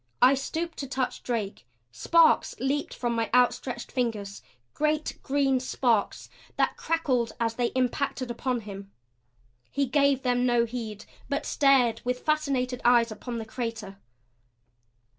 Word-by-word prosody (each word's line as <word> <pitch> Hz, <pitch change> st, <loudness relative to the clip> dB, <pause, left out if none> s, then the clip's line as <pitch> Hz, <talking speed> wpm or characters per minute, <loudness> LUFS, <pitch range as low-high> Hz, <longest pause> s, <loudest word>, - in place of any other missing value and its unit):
I 255 Hz, +2 st, +7 dB
stooped 320 Hz, +5 st, -3 dB
to 275 Hz, -, -4 dB
touch 260 Hz, -1 st, -2 dB
Drake; 210 Hz, -, -4 dB, 0.2 s
sparks 325 Hz, -, +3 dB
leaped 275 Hz, +3 st, -1 dB
from 240 Hz, -1 st, -2 dB
my 230 Hz, -1 st, -1 dB
outstretched 245 Hz, 0 st, +1 dB
fingers, 215 Hz, -6 st, -2 dB, 0.3 s
great 305 Hz, 0 st, -1 dB
green 270 Hz, -1 st, +1 dB
sparks 240 Hz, -4 st, 0 dB, 0.3 s
that -, -, +1 dB
crackled 270 Hz, -8 st, 0 dB
as 230 Hz, -1 st, 0 dB
they 240 Hz, +1 st, 0 dB
impacted 255 Hz, 0 st, -1 dB
upon 245 Hz, 0 st, -2 dB
him. 200 Hz, -1 st, -9 dB, 0.8 s
He 280 Hz, 0 st, 0 dB
gave 280 Hz, 0 st, +2 dB
them 245 Hz, -1 st, +1 dB
no 240 Hz, -1 st, +3 dB
heed; 220 Hz, -3 st, -6 dB, 0.2 s
but 280 Hz, -, -1 dB
stared 270 Hz, -5 st, +3 dB
with 250 Hz, 0 st, -2 dB
fascinated 275 Hz, -5 st, 0 dB
eyes 240 Hz, -1 st, +4 dB
upon 235 Hz, +3 st, -6 dB
the 225 Hz, -, -5 dB
crater. 220 Hz, -4 st, -5 dB
250 Hz, 135 wpm, -27 LUFS, 230-275 Hz, 0.8 s, I